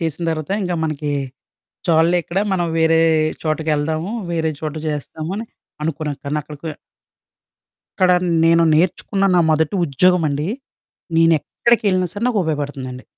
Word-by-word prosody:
చేసిన 165 0 -3
తర్వాత, 155 +1 -4
ఇంకా 180 -2 -1
మనకి 150 -1 -2 0.8
చాలులే 165 +1 +4
ఇక్కడ, 175 +4 -2
మనం 175 -2 0
వేరే 160 0 +4 0.4
చోటకి 155 0 -1
ఎళ్దాము, 160 +5 -2 0.2
వేరే 160 -2 0
చోట 155 -1 -4
చేస్తాము 155 +2 -5
అని 225 - -4 0.4
అనుకున్నా 155 -1 -2
కానీ, 145 +2 -1
అక్కడికె 150 +2 -7 1.3
ఇక్కడ 185 -1 +5 0.3
నేను 165 0 +5
నేర్చుకున్న 185 +4 +1
నా - - +5
మొదటి 155 +3 +1
ఉద్యోగం 175 +5 +3
అండి. 145 +3 -2 0.7
నేను 165 0 +5
ఎక్కడికెళ్ళినా 200 -6 +1
సరే, 205 +3 -3
నాకు 225 -5 +1
ఉపయోగపడుతుందండి. 140 -5 -4
160 Hz, 130 wpm, -19 LUFS, 150-180 Hz, 1.3 s, ఇక్కడ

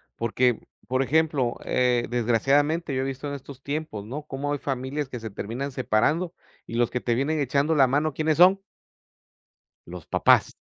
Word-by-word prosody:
porque, 120 +1 +1 0.3
por 130 +1 +1
ejemplo, 145 -3 +1
eh, 125 -1 +1
desgraciadamente 135 +7 +1
yo 130 - 0
he 135 - -1
visto 135 +1 -4
en 145 - -4
estos 140 -1 -9
tiempos, 140 -8 -4
¿no?, 145 +6 -6
como 145 0 -4
hay 145 - -3
familias 135 +1 -3
que 125 - -6
se 110 - -6
terminan 120 +7 -5
separando 130 - 0 0.3
y 115 - -6
los 120 0 +2
que 125 - -2
te 120 - 0
vienen 150 +5 0
echando 145 +3 +1
la 135 -3 +5
mano, 150 +3 0
¿quiénes 155 +1 0
son? 190 +2 +6 1.3
los - - -9
papás. - - +3
135 Hz, 175 wpm, -25 LUFS, 125-150 Hz, 1.3 s, son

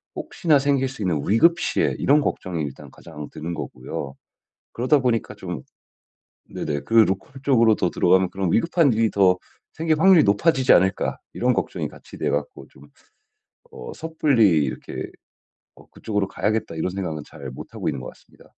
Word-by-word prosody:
혹시나 155 -5 +1
생길 135 -1 +1
수 130 -3 -9
있는 90 -6 0
위급 165 - +4
시에 - - 0
이런 145 +2 +3
걱정이 90 - -3
일단 70 -3 -8
가장 75 -1 -10
드는 85 +2 -5
거고요. 65 0 -6 0.6
그러다 130 +5 +2
보니까 120 -4 -1
좀 90 -5 -7 0.9
네네 75 -1 -3
그 115 - -6
'로컬 110 +4 +2
쪽으로 115 -5 +4
더 90 - 0
들어가면 95 0 +3
그런 95 -2 -2
위급한 165 +1 +3
일이 110 0 +2
더 95 -2 +3 0.3
생길 160 -1 0
확률이 190 -3 +6
높아지지 130 +6 +3
않을까.' 95 +2 +2
이런 125 +1 +1
걱정이 - - -2
같이 - - -14
돼 - - -1
갖고 - - -4
좀 - - -18 0.9
어 455 - -8
섣불리 130 - +2
이렇게 65 - -6 0.6
'어, - - -18
그쪽으로 105 -3 -3
가야겠다.' 110 -3 -2
이런 80 +3 -1
생각은 90 -5 -4
잘 70 -4 -10
못하고 65 - -6
있는 - - -3
것 - - -7
같습니다. - - -17
110 Hz, 350 characters per minute, -23 LUFS, 90-140 Hz, 0.9 s, 확률이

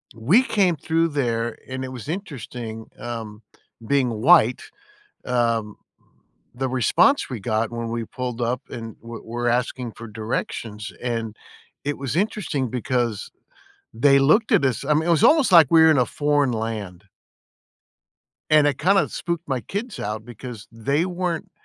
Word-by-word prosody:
we 155 - +4
came 195 -8 +2
through 165 +2 +1
there 120 -5 -1
and 130 0 -5
it 130 - -5
was 125 -2 -8
interesting, 125 - -6
um, 110 -3 -6 0.4
being 135 -1 +2
white, 120 +1 +4 0.6
um, 115 -4 0 0.8
the 130 +1 -1
response 130 - +3
we 125 -4 -5
got 110 +2 -1
when 115 -1 -4
we 115 0 -3
pulled 125 0 -5
up 120 +2 -1
and 115 -2 -7
we'r 115 0 -9
we're 120 +1 -3
asking 125 0 -1
for 115 +1 -10
directions, 110 -1 -4
and 115 -3 -3 0.5
it 145 0 -2
was 135 -1 -4
interesting 175 - -1
because 120 -3 -2 0.6
they 140 +4 +4
looked 160 +12 +3
at - - +4
us 130 +1 -1
I 150 - +3
mean, 155 +3 +1
it - - +1
was 165 -3 +3
almost 305 -8 +5
like 165 -5 +8
we 165 - +7
were 160 0 +7
in 150 - +3
a 125 - +3
foreign 145 -1 +1
land. 105 -5 -5 1.5
And 155 -1 +6
it 145 -2 0
kinda 195 +1 +3
spooked 170 -2 -4
my 130 -2 -1
kids 210 - -5
out 105 +1 -4
because 120 -1 -9
they 140 +8 0
weren't, 180 -2 -3
125 Hz, 160 wpm, -23 LUFS, 115-155 Hz, 1.5 s, like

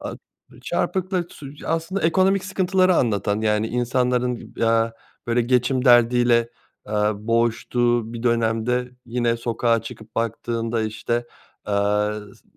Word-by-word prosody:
A - - -5 0.5
çarpıklık 185 -2 -1
sü 140 -2 -10
aslında 165 +4 -1
ekonomik 190 +3 +3
sıkıntıları 185 -1 +2
anlatan, 105 -2 +1
yani, 105 0 +1
insanların, 125 0 0 0.2
eee, 115 0 +2 0.3
böyle 120 +1 +2
geçim 125 +2 +1
derdiyle, 120 -1 +5 0.4
eee, - - -6 0.2
boğuştuğu 115 +1 0
bir 115 0 -6
dönemde, 115 +1 0 0.2
yine 120 0 0
sokağa 115 0 0
çıkıp 110 -2 -11
baktığında 115 0 -2
işte, 115 +2 -2 0.4
aaa, 105 +1 +1
s 105 - -11
ı - - -17
s - - -24
120 Hz, 125 wpm, -22 LUFS, 115-125 Hz, 0.5 s, derdiyle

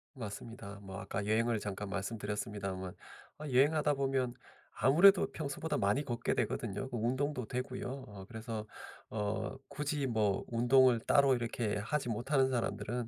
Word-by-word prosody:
맞습니다. 105 -3 -7
뭐 95 -2 -8
아까 95 +1 -3
여행을 115 +1 +2
잠깐 100 0 -4
말씀드렸습니다만 100 -2 -3 0.5
어 - - -7
여행하다 145 +3 +3
보면 135 -3 0 0.4
아무래도 180 +9 +6
평소보다 155 +1 -3
많이 105 +8 +2
걷게 120 -3 -1
되거든요. 115 0 -2
뭐 120 - -2
운동도 130 +1 0
되고요. 125 +1 -3 0.2
어 100 -2 -10
그래서 110 0 -5 0.4
어 105 +2 -2
굳이 145 -1 -1
뭐 105 -5 +1
운동을 125 +1 +5
따로 140 +2 +5
이렇게 115 -3 -1
하지 125 +5 -1
못하는 130 +4 +2
사람들은 120 -1 -2
120 Hz, 345 characters per minute, -33 LUFS, 105-135 Hz, 0.5 s, 아무래도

